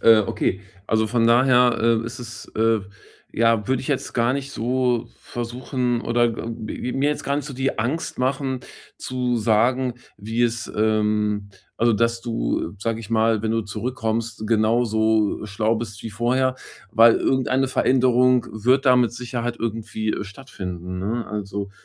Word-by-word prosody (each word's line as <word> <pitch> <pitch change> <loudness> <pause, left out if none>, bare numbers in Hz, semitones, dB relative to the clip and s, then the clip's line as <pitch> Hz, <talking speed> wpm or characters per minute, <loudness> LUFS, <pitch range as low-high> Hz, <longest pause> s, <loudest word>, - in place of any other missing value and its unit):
Äh, 115 -1 +7
okay. 95 - -1 0.3
Also, 110 0 +2
von 115 +1 +1
daher, 125 0 +5 0.2
äh, - - -9
ist 115 0 -6
es 120 -1 -8
äh, 115 0 +3 0.5
ja, 115 -2 +2
würde 130 -1 +1
ich - - -8
jetzt 140 -3 -1
gar 120 +1 +2
nicht 140 0 -3
so 125 -1 0
versuchen 120 0 -2
oder, 120 0 +1
äh, 120 - +4
m 115 0 -6 0.3
mir 140 +2 +2
jetzt 150 - -3
gar 140 - -1
nicht 145 - -3
so 140 -1 -7
die 135 -1 -1
Angst 130 +9 -2
machen 130 +1 -1 0.4
zu 125 -1 -2
sagen, 120 +3 +2 0.2
wie 110 +3 -2
es 120 0 -1
ähm, 105 -1 +1 0.3
also, 115 0 +3
dass 115 +2 +1
du, 115 -7 -2
äh, 100 - -14
sage 115 0 -1
ich 110 -3 -9
mal, 110 -1 +2
wenn 110 +1 -1
du 115 - +1
zurückkommst, 115 0 -3
genauso, 110 -1 +2
äh, - - -6
schlau 110 +3 0
bist 110 -2 -6
wie 115 - -5
vorher, 130 +4 +1 0.3
weil 115 +1 +7
irgendeine 130 0 +1
Veränderung 125 -1 +3
wird 125 +6 +2
da 130 -2 +6
mit 120 -2 +3
Sicherheit 120 -1 -4
irgendwie 110 -1 -2
stattfinden, 90 -6 -7
ne? 110 +5 -2
Also, 100 -1 -4
115 Hz, 165 wpm, -23 LUFS, 110-125 Hz, 0.5 s, Äh